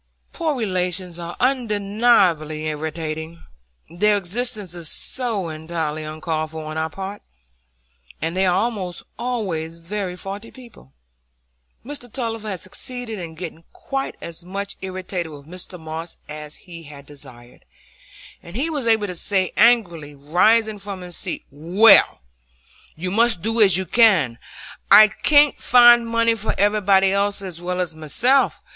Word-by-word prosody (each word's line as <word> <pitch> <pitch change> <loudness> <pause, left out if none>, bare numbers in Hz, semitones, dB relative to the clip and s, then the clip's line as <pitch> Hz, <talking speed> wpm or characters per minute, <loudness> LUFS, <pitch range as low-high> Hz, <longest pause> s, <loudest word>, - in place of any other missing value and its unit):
Poor 320 -3 -1
relations 180 -5 -2
are 170 0 -6
undeniably 205 - +1
irritating,—their 160 - -3
existence 205 0 -3
is 170 -3 -5
so 225 -9 -2
entirely 155 -1 -4
uncalled 155 0 -3
for 160 0 -7
on 155 0 -6
our 160 0 -2
part, 195 +4 -7 1.0
and 165 +2 -3
they 190 0 +2
are 180 - +2
almost 195 -4 -2 0.2
always 180 -10 -3
very 180 +2 -5
faulty 200 +4 -8
people. 235 - -16 0.9
Mr 280 -3 -8
Tulliver 225 -4 -4
had 190 -3 -4
succeeded 225 +4 -6
in 165 -2 -8
getting 165 -1 -8
quite 270 0 -4
as 170 +1 -6
much 195 +2 -5
irritated 185 -3 -5
with 145 -1 -12
Mr 180 +2 -8
Moss 160 +1 -7
as 150 0 -8
he 170 -3 -10
had 140 -1 -12
desired, 130 -4 -15 0.8
and 170 - -12
he 295 +7 -1
was 280 -6 -3
able 220 -2 +3
to 185 - -5
say 185 +1 0
angrily, 175 -11 +2
rising 210 +9 +2
from 200 -1 -7
his 180 -1 -8
seat,— - - -5
"Well, 180 +10 +6 0.7
you 180 +3 -4
must 225 -4 +3
do 225 +1 +1
as 195 -4 +6
you 190 - -2
can. 180 - +3 0.5
I 215 0 +9
can't 290 +6 +4
find 240 -1 +6
money 230 0 +2
for 220 -1 -3
everybody 200 -2 +3
else 200 0 0
as 175 -3 -5
well 180 +1 -3
as 175 -3 -1
myself. 230 - +1
185 Hz, 140 wpm, -21 LUFS, 160-220 Hz, 1.0 s, I